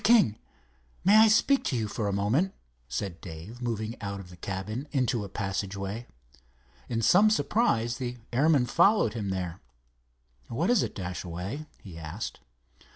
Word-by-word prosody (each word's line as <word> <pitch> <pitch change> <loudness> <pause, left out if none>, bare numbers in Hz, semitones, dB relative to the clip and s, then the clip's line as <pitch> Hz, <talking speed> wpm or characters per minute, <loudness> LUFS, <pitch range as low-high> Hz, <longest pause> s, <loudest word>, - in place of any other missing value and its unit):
King, 205 - +5 0.6
may 200 +3 +6
I 220 +1 +8
speak 265 +6 +4
to 130 - 0
you 110 -2 -1
for 105 0 -2
a - - 0
moment," 110 - +1 0.3
said 90 +7 -4
Dave, 90 +8 -9
moving 115 -1 -3
out 100 0 -4
of 90 -2 -10
the - - -11
cabin 100 - -4
into 125 -5 +1
a 100 - -7
passageway. 100 +2 -3 0.8
In 115 -1 -1
some 205 - +6
surprise 120 - +1
the 125 -1 -4 0.2
airman 140 0 +4
followed 175 - +4
him 105 -4 -3
there. 90 -2 -3 0.9
"What 165 - 0
is 245 - +4
it, - - -3
Dashaway?" 90 - -5
he 85 -5 -11
asked. 80 +7 -5
110 Hz, 155 wpm, -28 LUFS, 95-145 Hz, 0.9 s, I